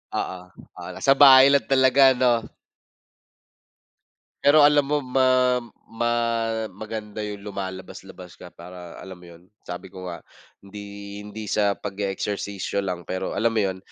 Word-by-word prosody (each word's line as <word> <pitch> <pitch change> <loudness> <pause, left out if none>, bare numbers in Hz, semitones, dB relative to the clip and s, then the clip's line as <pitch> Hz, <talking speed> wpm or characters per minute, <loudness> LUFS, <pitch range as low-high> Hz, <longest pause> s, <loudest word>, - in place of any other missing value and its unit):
Oo, 95 - -3 0.4
oo - - -8
nasa 135 - +1
bahay 135 -1 +8
lang 140 - +2
talaga 130 0 +5
ano? 120 -2 +1 2.0
Pero 150 +2 +6
alam 145 -1 +5
mo, 145 +1 0
ma 130 -1 +2 0.3
ma 120 +1 -1 0.6
maganda 105 +1 -7
yung 105 -1 -7
lumalabas-labas 95 -2 -9
ka 90 - -13
para 90 0 -11
alam 95 -1 -10
mo 90 - -16
yun, 85 +2 -20 0.2
sabi 90 +2 -8
ko 95 -1 -10
nga 85 -1 -7 0.4
hindi 100 0 -10
hindi 105 0 -8
sa 100 -1 +1
pag-e-eksersisyo 100 0 -4
lang 90 -2 -4
pero 95 +2 -5
alam 115 +2 +1
mo 115 - -4
yun, 95 -2 -1
100 Hz, 140 wpm, -23 LUFS, 95-125 Hz, 2.0 s, bahay